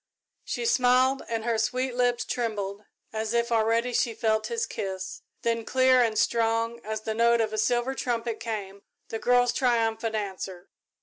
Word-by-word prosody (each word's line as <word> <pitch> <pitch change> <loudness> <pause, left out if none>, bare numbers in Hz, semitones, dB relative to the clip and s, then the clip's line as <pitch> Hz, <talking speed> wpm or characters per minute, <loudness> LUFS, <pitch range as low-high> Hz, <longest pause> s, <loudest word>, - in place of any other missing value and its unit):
She 475 - -3
smiled 255 - +3
and 225 -1 -2
her 230 -2 +1
sweet 255 +3 0
lips 245 -1 +1
trembled 210 -4 -3 0.3
as 220 +1 -2
if 235 0 +1
already 230 +2 +2
she 230 -1 +1
felt 220 -1 +1
his 465 0 -1
kiss, 190 -1 -5 0.2
then 230 -1 0
clear 255 +1 +4
and 225 -2 +1
strong 230 0 +1
as 215 0 -4
the 220 0 -3
note 235 +1 +3
of 220 -1 0
a - - -2
silver 240 +4 +1
trumpet 235 -3 -2
came 200 -4 -5 0.3
the 225 - -4
girl's 245 0 +3
triumphant 225 -3 +1
answer. 190 -3 -5
230 Hz, 165 wpm, -27 LUFS, 220-245 Hz, 0.3 s, clear